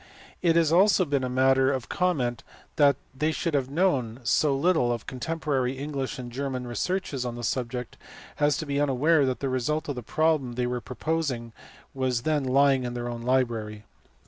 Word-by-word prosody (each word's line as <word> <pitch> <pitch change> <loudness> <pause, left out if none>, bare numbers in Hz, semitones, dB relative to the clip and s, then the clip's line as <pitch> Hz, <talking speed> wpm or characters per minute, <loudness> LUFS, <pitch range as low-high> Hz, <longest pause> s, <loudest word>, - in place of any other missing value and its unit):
It 165 -2 +3
has 165 -2 +3
been 170 - +5
also 200 -1 +5
a 140 -4 -1
matter 130 +1 +3
of 130 -3 -3
comment 135 -10 -1 0.3
that 145 -2 +5 0.2
they 155 +4 +1
should 165 +1 -2
have 135 -2 0
known 140 -8 0
so 135 +4 +2
little 160 -5 +2
of 120 -2 -3
contemporary 135 -1 -2
English 140 -1 -4
and 125 -2 -7
German 130 0 -3
researches 140 +2 -2
on 120 -1 -4
the 120 - -7
subject 125 0 -3 0.4
as 145 0 +3
to 160 - -4
be 140 0 -1
unaware 145 +2 +3
that 130 - -2
the 140 - -1
result 145 +5 -1
of 145 - -2
the 125 - -5
problem 155 0 +1
they 125 +1 -1
were 125 0 -2
proposing 130 -4 -3 0.4
was 130 -3 -1
then 150 -2 +1
lying 135 0 +3
in 120 0 -4
their 120 0 -3
own 120 -1 -5
library. 115 -4 -1
135 Hz, 185 wpm, -26 LUFS, 125-150 Hz, 0.4 s, been